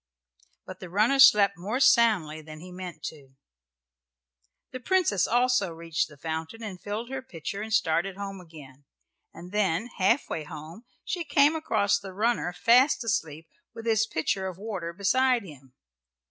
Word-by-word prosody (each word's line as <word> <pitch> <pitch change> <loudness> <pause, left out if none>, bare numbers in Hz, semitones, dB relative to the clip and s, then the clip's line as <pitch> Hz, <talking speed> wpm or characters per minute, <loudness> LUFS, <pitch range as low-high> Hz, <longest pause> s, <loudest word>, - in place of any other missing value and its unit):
But 185 -1 -10
the 180 - -9
runner 215 +9 +2
slept 205 -8 +6
more 210 +8 -2
soundly 210 - +3
than 155 0 -11
he 180 +3 -11
meant 180 -3 -8
to 165 - -5
do. 135 - -31 1.4
The 255 - -6
Princess 340 - +1
also 245 -5 +2
reached 165 -1 -2
the 150 - -16
fountain 160 +8 -5
and 190 -4 -7
filled 220 +4 -5
her 265 0 -4
pitcher 195 - -7
and 220 +1 -6
started 185 -2 +1
home 195 -1 -6
again, 145 -5 -15 0.5
and 180 +1 -12
then, 210 +2 0
half 200 +8 +2
way 160 - -4
home, 155 +9 -10 0.2
she 350 - -3
came 295 0 +3
across 210 -11 +1
the 195 -2 -10
runner 220 -2 0
fast 240 +9 +3
asleep 160 -8 -3 0.3
with 225 - -9
his 220 -1 +2
pitcher 190 0 -2
of 185 -2 -7
water 195 -5 -5
beside 240 +6 +2
him. 135 -7 -14
195 Hz, 160 wpm, -27 LUFS, 165-230 Hz, 1.4 s, slept